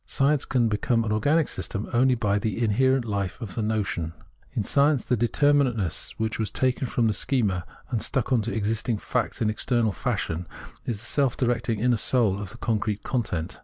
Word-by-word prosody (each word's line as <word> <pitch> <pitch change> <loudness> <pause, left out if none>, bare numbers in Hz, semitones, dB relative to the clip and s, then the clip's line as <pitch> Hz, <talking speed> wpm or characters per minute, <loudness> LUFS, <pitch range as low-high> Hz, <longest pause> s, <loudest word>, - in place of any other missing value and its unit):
Science 140 +1 +2
can 125 -3 +2
become 115 +2 +1
an 110 - -2
organic 145 +8 +2
system 105 -1 -4
only 130 +2 +4
by 105 -3 +1
the 110 0 -2
inherent 125 +3 +2
hfe 100 -2 -2
of 110 -6 -6
the 115 - -2
notion. 105 -7 -1 0.4
In 110 - -1
science 140 +3 +3
the 125 - +2
de 120 +1 +1
terminateness, 130 - +1
which 110 0 -2
was 110 - -1
taken 130 0 0
from 120 0 +1
the 110 - +2
schema 100 -9 0 0.2
and 115 -4 0
stuck 135 0 0
on 120 - +3
to 115 +3 -3
existing 110 +1 -1
facts 105 - -2
in 110 - +2
external 115 0 +1
fashion, 95 -8 -2 0.4
is 115 - -1
the - - -10
self 135 0 +1
directing 120 -3 0
inner 120 +1 +2
soul 105 -4 +1
of 100 - -6
the - - -10
concrete 105 -2 -1
content. 95 -9 -2
115 Hz, 195 wpm, -26 LUFS, 105-125 Hz, 0.4 s, only